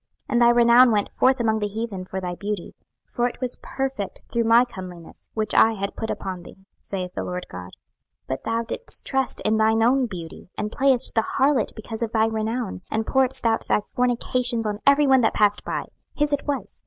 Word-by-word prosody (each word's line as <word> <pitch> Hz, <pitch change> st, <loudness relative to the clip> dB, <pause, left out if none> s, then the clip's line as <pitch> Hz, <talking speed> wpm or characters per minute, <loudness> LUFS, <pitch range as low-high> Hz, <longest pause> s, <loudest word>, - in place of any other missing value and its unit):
26:016:014 -, -, -55 dB, 0.2 s
And 240 Hz, -, +2 dB
thy 235 Hz, -, +7 dB
renown 240 Hz, +1 st, +6 dB
went 205 Hz, -2 st, +1 dB
forth 260 Hz, 0 st, +2 dB
among 220 Hz, -2 st, +1 dB
the 210 Hz, -, -1 dB
heathen 205 Hz, -3 st, -5 dB
for 190 Hz, +1 st, -5 dB
thy 180 Hz, -1 st, -4 dB
beauty: 205 Hz, +3 st, -5 dB, 0.3 s
for 240 Hz, 0 st, -1 dB
it 245 Hz, -, -8 dB
was 250 Hz, -1 st, -2 dB
perfect 265 Hz, -7 st, -4 dB
through 235 Hz, -1 st, 0 dB
my 230 Hz, +2 st, +6 dB
comeliness, 180 Hz, -7 st, -11 dB
which 215 Hz, -1 st, -1 dB
I 225 Hz, -, +5 dB
had 200 Hz, -2 st, -4 dB
put 220 Hz, -, -4 dB
upon 185 Hz, -2 st, -4 dB
thee, 190 Hz, +2 st, -15 dB, 0.2 s
saith 185 Hz, -2 st, -5 dB
the -, -, -4 dB
Lord 180 Hz, 0 st, -5 dB
GOD. 90 Hz, 0 st, -8 dB
26:016:015 -, -, -19 dB, 0.6 s
But 130 Hz, -, -3 dB
thou 230 Hz, 0 st, -1 dB
didst 470 Hz, -, -3 dB
trust 265 Hz, -1 st, 0 dB
in 215 Hz, +1 st, +1 dB
thine 220 Hz, +1 st, +3 dB
own 255 Hz, +2 st, +3 dB
beauty, 175 Hz, -4 st, -9 dB
and 210 Hz, 0 st, -3 dB
playedst 265 Hz, -1 st, +2 dB
the 225 Hz, -1 st, +1 dB
harlot 270 Hz, -2 st, +2 dB
because 220 Hz, +1 st, -7 dB
of 230 Hz, -1 st, -2 dB
thy 220 Hz, -1 st, +3 dB
renown, 220 Hz, -1 st, -3 dB
and 220 Hz, 0 st, -1 dB
pouredst 265 Hz, 0 st, +1 dB
out 225 Hz, -1 st, +1 dB
thy -, -, +2 dB
fornications 245 Hz, 0 st, -1 dB
on 210 Hz, -1 st, -2 dB
every 280 Hz, +1 st, +6 dB
one 265 Hz, -2 st, +5 dB
that 225 Hz, -, +1 dB
passed 205 Hz, -1 st, +2 dB
by; -, -, -3 dB, 0.3 s
his 295 Hz, 0 st, +1 dB
it 285 Hz, -, -2 dB
was. 265 Hz, -9 st, -4 dB
225 Hz, 215 wpm, -23 LUFS, 205-250 Hz, 0.6 s, thy